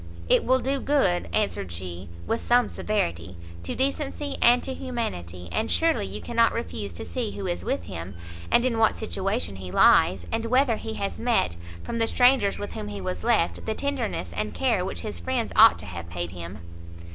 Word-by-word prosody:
"It -, -, +4 dB
will 260 Hz, +1 st, +3 dB
do 270 Hz, +2 st, -1 dB
good," 255 Hz, -12 st, +1 dB
answered 200 Hz, -, -1 dB
she, 90 Hz, +1 st, -7 dB, 0.2 s
with 230 Hz, -, -1 dB
some 245 Hz, 0 st, +3 dB
severity, 85 Hz, -, -2 dB, 0.2 s
"to 85 Hz, -, -5 dB
decency 280 Hz, +1 st, -1 dB
and 245 Hz, +1 st, +6 dB
to 265 Hz, -, -3 dB
humanity; 90 Hz, -, -4 dB
and 220 Hz, +1 st, -1 dB
surely 320 Hz, -11 st, +2 dB
you -, -, -5 dB
cannot 230 Hz, -1 st, +2 dB
refuse 105 Hz, -, -4 dB
to 85 Hz, -, -7 dB
see 90 Hz, +3 st, -3 dB
who 100 Hz, -1 st, -5 dB
is 85 Hz, -1 st, -2 dB
with 95 Hz, -2 st, -1 dB
him, 85 Hz, +2 st, -7 dB, 0.3 s
and 240 Hz, -, +4 dB
in 235 Hz, -3 st, 0 dB
what 220 Hz, -, +3 dB
situation 195 Hz, -, -2 dB
he 95 Hz, -1 st, -7 dB
lies, 90 Hz, 0 st, +5 dB
and 225 Hz, 0 st, -1 dB
whether 250 Hz, -1 st, +3 dB
he 220 Hz, 0 st, -6 dB
has 200 Hz, -, -3 dB
met, 230 Hz, -, +1 dB, 0.3 s
from 230 Hz, -, -4 dB
the 225 Hz, -, +2 dB
strangers 245 Hz, -6 st, +4 dB
with 205 Hz, -, -5 dB
whom 105 Hz, -, -5 dB
he 100 Hz, -1 st, -6 dB
was 90 Hz, -2 st, -4 dB
left, 85 Hz, 0 st, +1 dB
the 220 Hz, -, -1 dB
tenderness 240 Hz, -, -2 dB
and 105 Hz, +2 st, -3 dB
care 235 Hz, -8 st, +1 dB
which 190 Hz, -, -4 dB
his 215 Hz, -, -5 dB
friends 255 Hz, -3 st, -2 dB
ought 225 Hz, 0 st, +8 dB
to -, -, -6 dB
have 85 Hz, -2 st, -7 dB
paid 85 Hz, 0 st, -4 dB
him." 90 Hz, +2 st, -7 dB
205 Hz, 195 wpm, -26 LUFS, -, 0.3 s, ought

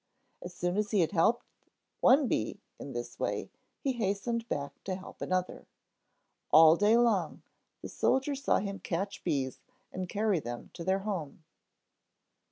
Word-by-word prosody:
As 175 Hz, 0 st, -8 dB
soon 175 Hz, +2 st, -1 dB
as 210 Hz, 0 st, 0 dB
he 205 Hz, -3 st, +3 dB
had 165 Hz, -, +1 dB
helped 210 Hz, +6 st, +2 dB, 0.5 s
one 270 Hz, +1 st, +5 dB
bee -, -, -1 dB, 0.2 s
in -, -, -7 dB
this -, -, -6 dB
way, -, -, -2 dB, 0.3 s
he 275 Hz, -, +1 dB
hastened 230 Hz, +1 st, -2 dB
back 140 Hz, 0 st, -4 dB
to 190 Hz, -, -2 dB
help 190 Hz, -, -11 dB
another. 185 Hz, 0 st, -2 dB, 0.8 s
All 160 Hz, +1 st, +8 dB
day 210 Hz, +5 st, +4 dB
long 215 Hz, -9 st, +1 dB, 0.4 s
the -, -, -4 dB
soldier 265 Hz, +2 st, +1 dB
saw 275 Hz, 0 st, +1 dB
him 200 Hz, 0 st, -3 dB
catch 200 Hz, -3 st, -3 dB
bees 130 Hz, -2 st, -1 dB, 0.3 s
and 185 Hz, -1 st, -5 dB
carry 210 Hz, -3 st, +1 dB
them 120 Hz, -3 st, -7 dB
to 170 Hz, -, -7 dB
their 190 Hz, +2 st, +1 dB
home. 170 Hz, -7 st, -4 dB
195 Hz, 155 wpm, -30 LUFS, 170-225 Hz, 0.8 s, All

